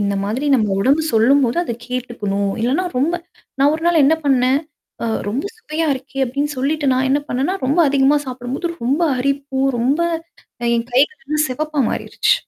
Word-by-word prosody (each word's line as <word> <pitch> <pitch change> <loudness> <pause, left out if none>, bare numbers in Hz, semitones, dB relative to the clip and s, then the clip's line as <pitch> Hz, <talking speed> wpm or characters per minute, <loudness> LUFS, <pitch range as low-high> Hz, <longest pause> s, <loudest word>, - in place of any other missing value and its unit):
இந்த 200 0 0
மாதிரி 235 +8 -2
நம்ம 220 -5 +2
உடம்பு 275 +8 +3
சொல்லும்போது 240 +3 +3
அத 240 - -3 0.2
கேட்டுக்கணும். 210 -6 -2
இல்லன்னா 275 +10 +1
ரொம்ப 305 +7 +1 0.4
நான் 280 +2 +4
ஒரு 320 - -5
நாள் 340 -3 +4
என்ன 300 +4 +5
பண்ணேன், 260 -1 +3 0.5
அ - - 0 0.2
ரொம்ப 250 +7 -2
சுவையா 325 -6 -3
இருக்கே 270 +1 -4
அப்படின்னு 285 +4 -2
சொல்லிட்டு 290 +3 0
நான் 260 +1 +1
என்ன 285 +2 +3
பண்ணேன்னா, 275 +9 0
ரொம்ப 280 +6 +1
அதிகமா 275 +1 +4
சாப்பிடும்போது 255 +6 -4 0.2
ரொம்ப 280 +8 +1 0.2
அரிப்பு, 275 +1 -1 0.2
ரொம்ப 270 +7 +1 0.8
என் 230 0 -2
கைகள்லாம் 300 +2 +1
செவப்பா 300 +2 -1
மாறிருச்சு. - - +1
270 Hz, 160 wpm, -19 LUFS, 250-295 Hz, 0.8 s, என்ன